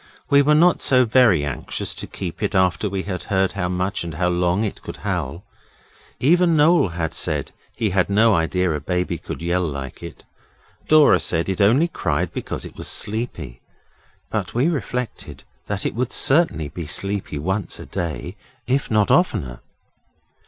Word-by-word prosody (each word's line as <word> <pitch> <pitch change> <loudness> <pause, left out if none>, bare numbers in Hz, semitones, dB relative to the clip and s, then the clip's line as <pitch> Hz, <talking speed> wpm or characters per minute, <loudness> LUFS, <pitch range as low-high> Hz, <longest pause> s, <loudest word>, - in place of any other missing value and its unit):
We 140 0 +7
were 150 +2 +4
not 175 +3 +4
so 125 -1 +4
very 110 - +4
extra 70 -4 -4
anxious - - -3
to - - -6
keep - - -7
it - - -1
after 95 +2 +2
we 95 -1 -3
had 90 -3 -5
heard 95 -1 +1
how 90 - -3
much 90 +2 -1
and 85 -2 -6
how 90 +2 +1
long 90 +3 +1
it 105 - -4
could - - -8
howl. 75 +9 -3 0.8
Even 170 +4 +3
Noel 150 - +4
had 85 -2 -4
said 75 -4 -2 0.2
he 110 -3 -1
had 90 0 +1
no 110 +2 +4
idea 90 +1 +1
a 75 - -2
baby 90 +2 -2
could - - -7
yell 85 +2 +1
like 70 -6 -5
it. - - -10 0.6
Dora 155 -1 +6
said 85 +2 -1
it 95 +2 -1
only 125 +12 +4
cried - - -2
because - - -5
it - - -10
was - - -2
sleepy, 95 - -1 0.7
but - - -3
we 130 +7 +2
reflected 125 -6 -4 0.2
that 100 -1 -3
it - - -1
would 120 +2 -2
certainly 135 - +2
be 80 +1 -7
sleepy 100 -1 -2
once 95 +6 -2
a - - -8
day, 85 +2 -5 0.3
if 135 +2 0
not 105 -3 +2
oftener. 60 -2 +1
95 Hz, 175 wpm, -21 LUFS, 85-125 Hz, 0.8 s, We